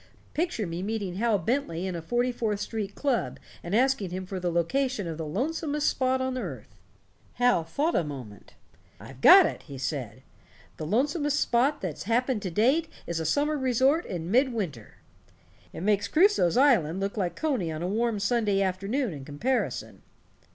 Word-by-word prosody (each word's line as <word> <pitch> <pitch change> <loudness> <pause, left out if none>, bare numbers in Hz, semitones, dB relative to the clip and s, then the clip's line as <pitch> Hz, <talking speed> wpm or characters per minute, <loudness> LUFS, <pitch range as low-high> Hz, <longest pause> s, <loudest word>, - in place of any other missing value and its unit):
Picture 320 - -1
me 170 0 -4
meeting 200 -3 -3
Hal 225 0 +2
Bentley 190 - -1
in 185 -2 -3
a 170 - -4
Forty 240 +8 0
fourth 220 -4 -2
Street 210 -2 -4
club 270 -5 -1 0.2
and 175 +4 -3
asking 255 -5 +2
him 185 +1 -5
for 185 0 -5
the 175 -1 -1
location 215 +6 0
of 165 -1 -5
the 160 - -4
lonesomest 295 - -1
spot 260 0 +1
on 260 0 -2
earth. 135 - -7 0.6
Hal 245 -8 +3
thought 285 - -1
a - - +2
minute. 130 -9 -9 0.4
'I've 135 0 -12
got 375 - +9
it', - - -3
he 140 -3 -10
said, 130 -3 -4 0.5
'the 155 - -5
lonesomest 290 - +1
spot 255 +4 +2
that's 180 -4 -5
happened 240 +1 +1
to 190 - -3
date 260 - +2 0.2
is 170 -1 -3
a 160 - -3
summer 295 - +1
resort 260 +5 +2
in 175 -1 -4
mid 260 +3 +4
winter. 165 - -6 0.7
It - - -8
makes 205 +1 +1
Crusoe's 325 - +3
island 200 - +4
look 195 +1 -2
like 180 -5 -2
Coney 255 - -1
on 155 +1 -4
a - - -1
warm 225 +2 0
Sunday 205 -1 +1
afternoon 195 - -1
in 140 -3 -8
comparison.' 190 - -2
210 Hz, 175 wpm, -27 LUFS, 170-260 Hz, 0.7 s, got